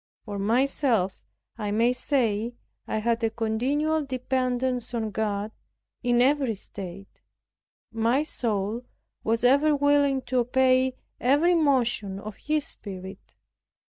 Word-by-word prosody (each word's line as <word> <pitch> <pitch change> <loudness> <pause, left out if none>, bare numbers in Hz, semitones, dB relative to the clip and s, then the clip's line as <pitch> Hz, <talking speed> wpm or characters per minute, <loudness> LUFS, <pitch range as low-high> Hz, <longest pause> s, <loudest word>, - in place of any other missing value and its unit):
For 205 -2 -5
myself 230 -2 +1 0.4
I 210 -1 -2
may 230 +4 +3
say 235 -3 0 0.3
I - - -1
had 230 +1 0
a 225 - +3
continual 260 +8 0
dependence 255 -2 -1
on 220 -2 -2
God, 210 0 -2 0.5
in 245 0 +3
every 270 -4 +2
state; 195 -1 -10 0.7
my 230 +5 +2
soul 225 -5 -2 0.4
was 230 +1 0
ever 285 +4 +5
willing 285 -2 +3
to 255 0 0
obey 255 +1 +3 0.2
every 290 +8 +3
motion 245 - +1
of 210 0 -8
His 305 -1 -1
Spirit. 190 -1 -6
245 Hz, 115 wpm, -26 LUFS, 215-270 Hz, 0.7 s, ever